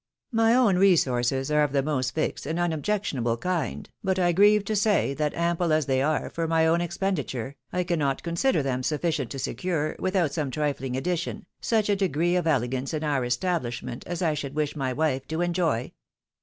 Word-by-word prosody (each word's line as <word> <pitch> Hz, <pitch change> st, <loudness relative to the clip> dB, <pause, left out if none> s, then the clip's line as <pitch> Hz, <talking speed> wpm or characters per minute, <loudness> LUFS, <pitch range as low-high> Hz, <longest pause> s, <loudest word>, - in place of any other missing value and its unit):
My 225 Hz, 0 st, +4 dB
own 230 Hz, -8 st, +4 dB
resources 135 Hz, -7 st, +2 dB
are 150 Hz, 0 st, +4 dB
of 145 Hz, -2 st, +1 dB
the 140 Hz, -1 st, +2 dB
most 130 Hz, -4 st, -1 dB
fixed 155 Hz, -3 st, -2 dB
and 160 Hz, +2 st, -2 dB
unobjectionable 160 Hz, -, -1 dB
kind; 175 Hz, 0 st, -2 dB, 0.2 s
but 190 Hz, -1 st, +1 dB
I 175 Hz, -1 st, +3 dB
grieve 205 Hz, +3 st, +5 dB
to 215 Hz, -, -1 dB
say 205 Hz, -8 st, +2 dB
that, 150 Hz, +1 st, -1 dB
ample 170 Hz, 0 st, 0 dB
as 155 Hz, -1 st, +2 dB
they 130 Hz, -1 st, +1 dB
are 150 Hz, +2 st, 0 dB
for 165 Hz, -1 st, -2 dB
my 160 Hz, 0 st, +3 dB
own 165 Hz, +1 st, +3 dB
expen 180 Hz, +3 st, -1 dB
diture, 135 Hz, -2 st, -4 dB, 0.2 s
I 180 Hz, 0 st, 0 dB
cannot 155 Hz, -6 st, -1 dB
consider 170 Hz, -, +1 dB
them 130 Hz, -2 st, -1 dB
sufficient 150 Hz, -1 st, -1 dB
to 140 Hz, -, -6 dB
secure, 155 Hz, +4 st, -2 dB
without 185 Hz, -6 st, 0 dB
some 150 Hz, -3 st, -1 dB
triiiing 135 Hz, -3 st, -2 dB
addition, 175 Hz, +5 st, -2 dB
such 220 Hz, -2 st, +1 dB
a 205 Hz, -, +3 dB
degree 175 Hz, -2 st, +1 dB
of 175 Hz, -2 st, 0 dB
elegance 130 Hz, 0 st, 0 dB
in 155 Hz, -, -3 dB
our 145 Hz, -4 st, 0 dB
establish 120 Hz, 0 st, -1 dB
ment 125 Hz, -1 st, -6 dB
as 175 Hz, +1 st, -3 dB
I 160 Hz, -2 st, +2 dB
should 145 Hz, -1 st, -5 dB
wish 150 Hz, -1 st, -1 dB
my 135 Hz, -3 st, -1 dB
wife 135 Hz, -2 st, -1 dB
to 160 Hz, +2 st, -2 dB
enjoy. 170 Hz, -9 st, 0 dB
155 Hz, 195 wpm, -26 LUFS, 135-180 Hz, 0.2 s, grieve